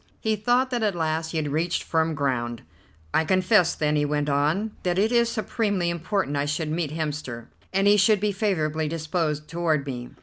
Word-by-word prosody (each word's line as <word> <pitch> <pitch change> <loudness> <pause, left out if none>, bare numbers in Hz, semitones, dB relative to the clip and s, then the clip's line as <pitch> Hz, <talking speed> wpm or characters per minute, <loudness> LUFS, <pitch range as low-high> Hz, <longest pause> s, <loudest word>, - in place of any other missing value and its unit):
He 220 -1 0
thought 245 +5 +1
that 245 -2 -1
at 210 -4 +1
last 160 -1 -1
he 165 - -3
had 150 -2 -1
reached 165 +4 0
firm 160 -1 0
ground. 120 -5 -2 0.5
"I 160 - +3
confess, 185 +1 +3
then," 150 0 0
he 145 - +2
went 145 0 0
on, 155 +10 +1
"that 180 -1 0
it 215 +4 +2
is 235 -1 +3
supremely 205 -6 -1
important 170 -2 -1
I 140 0 0
should 150 +1 -2
meet 160 -1 -1
Hemster, 150 -6 -4 0.2
and 195 +1 +1
he 205 +1 +6
should 205 +1 +4
be 210 +1 +1
favourably 160 -7 0
disposed 155 -1 -2
toward 160 -3 0
me. 125 -3 -5
165 Hz, 195 wpm, -25 LUFS, 150-200 Hz, 0.5 s, he